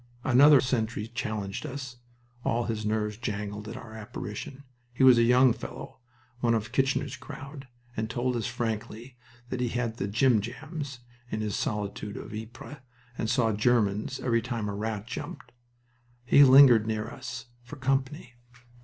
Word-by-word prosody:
Another 140 +3 +7
sentry 115 -4 -1
challenged 110 -4 -4
us 135 -4 -6 0.5
all 120 +1 +1
his 110 -2 -3
nerves 105 -1 -1
jangled 105 -2 -4
at - - -6
our 110 -2 -10
apparition. 110 +5 -7 0.3
He 125 +2 0
was 130 -2 +8
a - - +5
young 125 +1 +5
fellow, - - -9 0.4
one 115 -1 +2
of 110 +1 -3
"Kitchener's 135 0 0
crowd," 140 +1 -9 0.3
and 110 0 -2
told 120 +1 -1
us 115 - -1
frankly 115 +2 -4 0.3
that 125 -1 -3
he 125 - +1
had 115 -1 -2
the 100 - -2
"jimjams" 130 - -1 0.3
in 110 - -3
this 105 -2 -2
solitude 105 0 -3
of - - -8
Ypres 115 +6 -8 0.4
and 110 - -2
"saw 115 -3 +2
Germans" 105 +1 +1
every 115 -2 +1
time 115 -3 -3
a - - -3
rat 105 0 -3
jumped. 130 0 -7 0.7
He 140 +3 +7
lingered 130 -5 +8
near 110 -1 -2
us - - -7 0.2
"for 120 +4 -10
company. 135 0 -1
120 Hz, 155 wpm, -28 LUFS, 110-130 Hz, 0.7 s, was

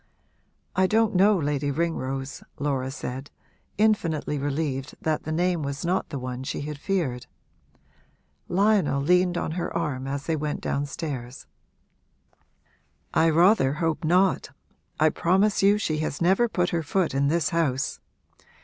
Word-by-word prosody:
'I 190 0 +4
don't 220 +1 +2
know 200 +2 +5
Lady 145 -2 -1
Ringrose,' 135 -3 -2 0.2
Laura 135 -3 -1
said, 135 0 -6 0.5
infinitely 165 -9 +1
relieved 140 -1 -2
that 155 -1 -1
the 155 - -3
name 175 +1 +1
was 140 +2 -4
not 180 +2 0
the 140 - -4
one 125 -1 -5
she 130 - -4
had 150 0 -6
feared. 145 -10 -2 1.2
Lionel 195 -6 +2
leaned 180 +4 +3
on 160 - -2
her 175 +2 -3
arm 140 -6 -2
as 140 +1 -4
they 165 - 0
went 150 -1 -3
downstairs. 140 -3 -4 1.7
'I 165 - +4
rather 165 -3 +4
hope 165 +1 -1
not 180 +4 +2 0.5
I 155 +1 +5
promise 190 +6 +2
you 200 +1 +5
she 155 -7 -1
has 155 -2 -3
never 195 +8 +3
put 180 -4 0
her 170 - 0
foot 170 +2 0
in 140 +1 +2
this 165 +2 +1
house! 145 -6 0
155 Hz, 140 wpm, -25 LUFS, 140-180 Hz, 1.7 s, know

